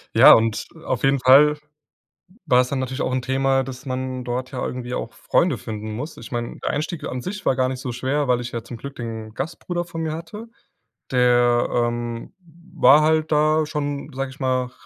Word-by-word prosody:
Ja -, -, +10 dB
und 115 Hz, -1 st, +2 dB, 0.2 s
auf 130 Hz, -1 st, -2 dB
jeden 135 Hz, 0 st, +3 dB
Fall 145 Hz, +4 st, +6 dB, 0.9 s
war's 125 Hz, -3 st, +4 dB
dann 135 Hz, 0 st, -2 dB
natürlich 130 Hz, +1 st, -3 dB
auch 130 Hz, -, -1 dB
'n 130 Hz, -, 0 dB
Thema, 135 Hz, +1 st, +1 dB
dass 130 Hz, +1 st, -9 dB
man 130 Hz, -1 st, -4 dB
dort 125 Hz, +1 st, -3 dB
ja 130 Hz, -, -3 dB
irgendwie 125 Hz, -1 st, -5 dB
auch -, -, -4 dB
Freunde -, -, +1 dB
finden 110 Hz, 0 st, -6 dB
muss. 150 Hz, +8 st, -6 dB
Ich -, -, -11 dB
mein, 120 Hz, 0 st, -4 dB
der -, -, -2 dB
Einstieg 155 Hz, +3 st, -3 dB
an 125 Hz, -1 st, -4 dB
sich 200 Hz, +5 st, -6 dB
war 130 Hz, -, +3 dB
gar 130 Hz, 0 st, +1 dB
nicht 130 Hz, -1 st, -5 dB
so 125 Hz, -2 st, -5 dB
schwer, 135 Hz, +3 st, -1 dB
weil 125 Hz, -1 st, +2 dB
ich 120 Hz, -, -6 dB
ja 115 Hz, -, -4 dB
zum 115 Hz, +1 st, -9 dB
Glück 140 Hz, +4 st, -9 dB
den 110 Hz, -2 st, -6 dB
Gastbruder 175 Hz, +5 st, -4 dB
vor 165 Hz, -1 st, -6 dB
mir 160 Hz, -1 st, -2 dB
hatte. 170 Hz, +8 st, -8 dB, 0.6 s
Der, 120 Hz, -1 st, +3 dB
ähm, 120 Hz, -1 st, -2 dB, 0.4 s
war 140 Hz, 0 st, +7 dB
halt 155 Hz, 0 st, +2 dB
da 155 Hz, +1 st, +3 dB
schon, 145 Hz, -1 st, -4 dB
sag 135 Hz, +1 st, -3 dB
ich 130 Hz, +2 st, -14 dB
mal, 130 Hz, -1 st, +1 dB
r 125 Hz, -, -12 dB
130 Hz, 205 wpm, -22 LUFS, 120-150 Hz, 0.9 s, Ja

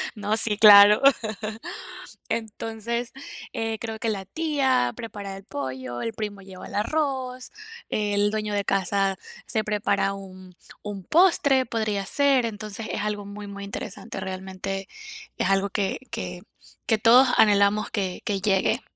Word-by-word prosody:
no, 210 Hz, +1 st, -1 dB
sí, 215 Hz, -2 st, +1 dB
claro. 205 Hz, -1 st, +9 dB, 1.3 s
Entonces, 225 Hz, +2 st, -3 dB, 0.4 s
eh, 225 Hz, 0 st, -2 dB
creo 225 Hz, -1 st, -5 dB
que 225 Hz, -, -1 dB
la 195 Hz, -3 st, -3 dB
tía 265 Hz, -, +1 dB
prepara 200 Hz, -4 st, -7 dB
el 195 Hz, -, -12 dB
pollo, 130 Hz, -5 st, -5 dB
el 230 Hz, -, -3 dB
primo 210 Hz, -2 st, -5 dB
lleva 190 Hz, -1 st, -11 dB
el -, -, -9 dB
arroz, 255 Hz, +1 st, -2 dB, 0.4 s
el 205 Hz, -1 st, +1 dB
dueño 215 Hz, -1 st, -2 dB
de 200 Hz, -1 st, -1 dB
casa 195 Hz, 0 st, +1 dB, 0.3 s
se 220 Hz, -, +1 dB
prepara 200 Hz, -2 st, 0 dB
un 185 Hz, -2 st, -11 dB, 0.3 s
un 200 Hz, -3 st, -6 dB
postre, 290 Hz, -, +4 dB
podría 215 Hz, -4 st, -2 dB
ser. 275 Hz, -1 st, +4 dB
Entonces, 215 Hz, 0 st, -6 dB
es -, -, -3 dB
algo 210 Hz, -1 st, -3 dB
muy, 205 Hz, +1 st, -8 dB
muy 200 Hz, 0 st, -8 dB
interesante. 200 Hz, -1 st, -7 dB
Realmente 190 Hz, 0 st, -5 dB, 0.5 s
es 185 Hz, -, 0 dB
algo 195 Hz, +1 st, +2 dB
que 195 Hz, -1 st, -1 dB
que -, -, -5 dB, 0.5 s
que 220 Hz, -, +3 dB
todos 245 Hz, +4 st, +7 dB
anhelamos 205 Hz, -1 st, +4 dB
que 190 Hz, -3 st, -3 dB
que 200 Hz, -4 st, -1 dB
llegue, 195 Hz, -2 st, +1 dB
205 Hz, 140 wpm, -25 LUFS, 195-225 Hz, 1.3 s, claro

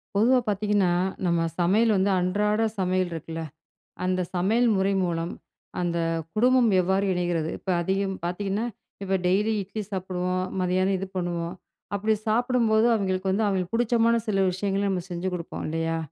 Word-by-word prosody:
பொதுவா 245 Hz, +5 st, +4 dB
பார்த்தீங்கன்னா, 205 Hz, -3 st, +2 dB, 0.3 s
நம்ம 170 Hz, -1 st, +2 dB, 0.2 s
சமையல் 210 Hz, +6 st, +3 dB
வந்து 195 Hz, +2 st, +2 dB
அன்றாட 210 Hz, +4 st, +1 dB, 0.2 s
சமையல் 185 Hz, -1 st, 0 dB
இருக்குல்ல, 165 Hz, 0 st, -5 dB, 0.6 s
அந்த 185 Hz, 0 st, +1 dB
சமையல் 220 Hz, +7 st, +2 dB
முறை 195 Hz, +1 st, +2 dB
மூலம் 170 Hz, -1 st, -2 dB, 0.5 s
அந்த 175 Hz, -1 st, -1 dB, 0.4 s
குடும்பம் 250 Hz, +1 st, +4 dB
எவ்வாறு 190 Hz, +2 st, +1 dB
இணைகிறது? 175 Hz, -3 st, -1 dB
இப்ப -, -, -8 dB
அதிகம் 195 Hz, +2 st, -1 dB
பார்த்திங்கன்னா, 195 Hz, +5 st, -2 dB, 0.4 s
இப்ப 195 Hz, 0 st, +1 dB
டெய்லி 205 Hz, +4 st, +2 dB
இட்லி 205 Hz, +3 st, -5 dB
சாப்பிடுவோம், 185 Hz, -1 st, -2 dB, 0.2 s
மதியானம் 185 Hz, +2 st, +1 dB
இது 195 Hz, +1 st, -4 dB
பண்ணுவோம். 175 Hz, -1 st, -2 dB, 0.4 s
அப்பிடி 215 Hz, +2 st, +1 dB
சாப்பிடும்போது 230 Hz, -1 st, +3 dB
அவிங்களுக்கு 190 Hz, -2 st, 0 dB
வந்து, 210 Hz, +3 st, +1 dB
அவிங்களுக்கு 190 Hz, 0 st, -1 dB
பிடிச்சமான 235 Hz, 0 st, +3 dB
சில 195 Hz, -2 st, +2 dB
விஷயங்கள 195 Hz, +2 st, -1 dB
நம்ம 185 Hz, -2 st, -1 dB
செஞ்சு 175 Hz, +2 st, -3 dB
குடுப்போம் 170 Hz, -1 st, -6 dB
இல்லையா. 165 Hz, +1 st, -1 dB
190 Hz, 140 wpm, -26 LUFS, 180-210 Hz, 0.6 s, பொதுவா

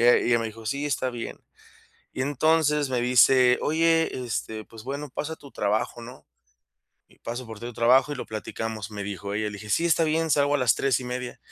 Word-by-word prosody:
y -, -, +2 dB
ella 120 Hz, 0 st, +6 dB
y -, -, -2 dB
ella 120 Hz, -, +4 dB
me 115 Hz, -, -2 dB
dijo: 110 Hz, 0 st, -9 dB
"Sí, 140 Hz, +6 st, -2 dB
está 130 Hz, -3 st, -1 dB
bien". 120 Hz, -1 st, -6 dB, 0.8 s
Y 130 Hz, -, -3 dB
entonces 150 Hz, +1 st, +2 dB
me 125 Hz, -2 st, 0 dB
dice: 125 Hz, +1 st, +5 dB
"Oye, 165 Hz, +1 st, +2 dB, 0.2 s
este, 110 Hz, -1 st, -4 dB
pues 110 Hz, 0 st, -13 dB
bueno, 140 Hz, +2 st, -5 dB
paso 155 Hz, +5 st, -4 dB
a -, -, -8 dB
tu 140 Hz, -3 st, -15 dB
trabajo, 105 Hz, +3 st, -1 dB
¿no? 125 Hz, +2 st, -11 dB, 0.8 s
Y -, -, -24 dB
paso 120 Hz, +1 st, -6 dB
por 110 Hz, -2 st, -9 dB
ti 120 Hz, -, -6 dB
a -, -, -4 dB
tu 120 Hz, -, -9 dB
trabajo 125 Hz, +5 st, +4 dB
y 145 Hz, -, -2 dB
lo -, -, -5 dB
platicamos", 110 Hz, -1 st, -5 dB
me 105 Hz, -1 st, -5 dB
dijo 100 Hz, 0 st, -5 dB
ella. 105 Hz, 0 st, -1 dB
Le 105 Hz, -, -7 dB
dije: 110 Hz, -, -10 dB
"Sí, 165 Hz, +11 st, +1 dB
está 165 Hz, -1 st, +3 dB
bien, 160 Hz, +1 st, 0 dB
salgo 145 Hz, 0 st, +3 dB
a 145 Hz, -, +3 dB
las 125 Hz, -4 st, +3 dB
3 135 Hz, -2 st, +2 dB
y -, -, -7 dB
media". 125 Hz, 0 st, -5 dB
125 Hz, 240 wpm, -26 LUFS, 110-145 Hz, 0.8 s, ella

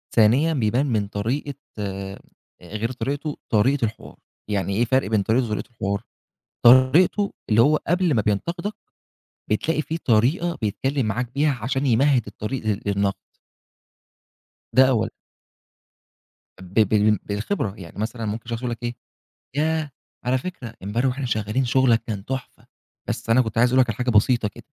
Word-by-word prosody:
ثانيًا، 125 Hz, +9 st, +4 dB
بيبان 125 Hz, 0 st, +1 dB
من 110 Hz, -7 st, 0 dB
طريقة 120 Hz, +8 st, -2 dB, 0.3 s
آآ، 100 Hz, -1 st, -5 dB, 0.4 s
غير 110 Hz, +6 st, -4 dB
طريقته، 140 Hz, +3 st, -3 dB
طريقة 120 Hz, +4 st, +3 dB
الحوار، 110 Hz, -, -7 dB, 0.3 s
يعني 100 Hz, -2 st, -1 dB
إيه 120 Hz, +3 st, +2 dB
فرق 130 Hz, -1 st, +1 dB
بين 110 Hz, -1 st, +2 dB
طريقته 115 Hz, +5 st, +1 dB
وطريقة 105 Hz, -, -3 dB
الحوار؟ 100 Hz, -3 st, -2 dB, 0.6 s
طريقته 130 Hz, -, +5 dB, 0.2 s
اللي 110 Hz, +1 st, +5 dB
هو 150 Hz, +5 st, +4 dB
قبل 175 Hz, 0 st, +1 dB
ما 110 Hz, -, +2 dB
بينتقدك، 170 Hz, -, -1 dB, 0.8 s
بتلاقي 155 Hz, +9 st, +1 dB
في 160 Hz, +2 st, -4 dB
طريقة 150 Hz, +8 st, +1 dB
بيتكلم 130 Hz, +5 st, -1 dB
معاك 120 Hz, +2 st, -2 dB
بيها 145 Hz, +1 st, +2 dB
عشان 130 Hz, +4 st, -1 dB
يمهد 130 Hz, +1 st, +3 dB
الطريق 105 Hz, +3 st, -5 dB
لل 105 Hz, -1 st, 0 dB
للنقد. 100 Hz, -1 st, +1 dB, 1.6 s
ده 130 Hz, +1 st, +8 dB
أولًا. 110 Hz, -4 st, +1 dB, 1.5 s
ب 95 Hz, 0 st, -12 dB
بال 105 Hz, 0 st, +4 dB
بالخبرة، 105 Hz, -, -2 dB
يعني 85 Hz, -3 st, -11 dB
مثلًا 115 Hz, +1 st, -3 dB
ممكن 110 Hz, +2 st, -4 dB
شخص 115 Hz, -1 st, -2 dB
يقول 125 Hz, -1 st, -3 dB
لك 120 Hz, +1 st, -6 dB
إيه، 120 Hz, 0 st, -3 dB, 0.6 s
ياه! 155 Hz, +1 st, 0 dB, 0.3 s
على 125 Hz, +1 st, +2 dB
فكرة، 130 Hz, -7 st, -7 dB
امبارح 110 Hz, +7 st, 0 dB
وإحنا 130 Hz, +1 st, -2 dB
شغالين 110 Hz, +3 st, 0 dB
شُغلك 120 Hz, -2 st, +3 dB
كان 105 Hz, -5 st, -4 dB
تحفة، 130 Hz, +1 st, -6 dB, 0.4 s
بس -, -, -3 dB
أنا 115 Hz, +3 st, +6 dB
كنت 110 Hz, -2 st, -4 dB
عايز 120 Hz, +1 st, +5 dB
أقول 130 Hz, +1 st, +4 dB
لك 125 Hz, -2 st, +3 dB
على 105 Hz, -, -4 dB
حاجة 125 Hz, 0 st, 0 dB
بسيطة 110 Hz, +1 st, +3 dB
كده. 100 Hz, -, -14 dB
120 Hz, 155 wpm, -23 LUFS, 105-135 Hz, 1.6 s, ده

